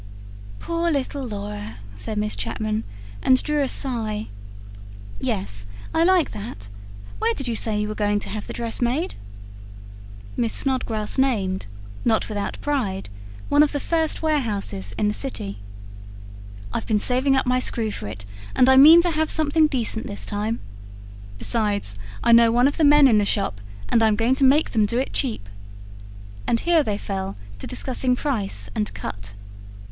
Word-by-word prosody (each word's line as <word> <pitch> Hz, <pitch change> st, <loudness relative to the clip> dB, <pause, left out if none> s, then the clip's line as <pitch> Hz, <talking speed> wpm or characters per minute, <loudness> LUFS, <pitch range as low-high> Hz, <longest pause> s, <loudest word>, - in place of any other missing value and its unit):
"Poor 335 Hz, -, -1 dB
little 280 Hz, -2 st, -2 dB
Laura," 110 Hz, -, -6 dB, 0.2 s
said 100 Hz, -, -5 dB
Miss 210 Hz, 0 st, -1 dB
Chapman, 215 Hz, 0 st, -2 dB, 0.4 s
and 255 Hz, 0 st, +4 dB
drew 300 Hz, -1 st, 0 dB
a 275 Hz, -, +1 dB
sigh. 220 Hz, -6 st, -1 dB, 0.9 s
"Yes, 100 Hz, +1 st, -3 dB, 0.3 s
I 325 Hz, -, +3 dB
like 360 Hz, -2 st, +3 dB
that. 200 Hz, -, -7 dB, 0.5 s
Where 230 Hz, -, +1 dB
did 275 Hz, -, -4 dB
you 235 Hz, -, -1 dB
say 215 Hz, -1 st, 0 dB
you 210 Hz, -, -1 dB
were 215 Hz, -, -3 dB
going 205 Hz, -1 st, +1 dB
to -, -, -5 dB
have 215 Hz, -1 st, -5 dB
the -, -, -6 dB
dress 235 Hz, 0 st, -3 dB
made?" 255 Hz, +8 st, 0 dB, 1.2 s
Miss 230 Hz, -2 st, 0 dB
Snodgrass 245 Hz, -4 st, 0 dB
named, 195 Hz, -, 0 dB, 0.4 s
not 225 Hz, -1 st, +1 dB
without 205 Hz, -2 st, -3 dB
pride, 220 Hz, -, -2 dB, 0.4 s
one 290 Hz, +1 st, +4 dB
of 300 Hz, 0 st, +3 dB
the 285 Hz, -, 0 dB
first 320 Hz, +1 st, 0 dB
warehouses 205 Hz, -, -1 dB
in 210 Hz, -, +1 dB
the 210 Hz, -, +1 dB
city. 100 Hz, -, -5 dB, 1.1 s
"I've -, -, -3 dB
been 215 Hz, -, +2 dB
saving 260 Hz, +5 st, +2 dB
up 265 Hz, -, +2 dB
my 250 Hz, 0 st, +2 dB
screw 225 Hz, -3 st, 0 dB
for -, -, -6 dB
it, 105 Hz, -1 st, -8 dB, 0.3 s
and 255 Hz, -, +5 dB
I 265 Hz, 0 st, +6 dB
mean 320 Hz, +5 st, +9 dB
to 350 Hz, -, +1 dB
have 315 Hz, 0 st, 0 dB
something 310 Hz, 0 st, +3 dB
decent 235 Hz, -5 st, -1 dB
this 200 Hz, -, -6 dB
time. 215 Hz, +2 st, -2 dB, 0.8 s
Besides, 205 Hz, -, 0 dB, 0.3 s
I 235 Hz, -, +4 dB
know 230 Hz, 0 st, +7 dB
one 245 Hz, +3 st, +4 dB
of 285 Hz, -, -2 dB
the 320 Hz, -, +2 dB
men 295 Hz, -1 st, +7 dB
in 220 Hz, -4 st, +5 dB
the -, -, +2 dB
shop, 195 Hz, -, -1 dB, 0.3 s
and 230 Hz, -, +2 dB
I'm 220 Hz, -1 st, +4 dB
going 230 Hz, +4 st, +2 dB
to 270 Hz, -, 0 dB
make 280 Hz, +4 st, +4 dB
them 215 Hz, -3 st, +2 dB
do 235 Hz, -, 0 dB
it 260 Hz, -, -1 dB
cheap." 225 Hz, -, -2 dB, 1.0 s
And 230 Hz, -, +2 dB
here 340 Hz, -2 st, +4 dB
they 210 Hz, -8 st, -1 dB
fell 195 Hz, -, -4 dB, 0.2 s
to -, -, -6 dB
discussing 255 Hz, 0 st, 0 dB
price 205 Hz, -, -2 dB
and 105 Hz, 0 st, -2 dB
cut. 100 Hz, 0 st, -6 dB
230 Hz, 170 wpm, -23 LUFS, 205-275 Hz, 1.2 s, mean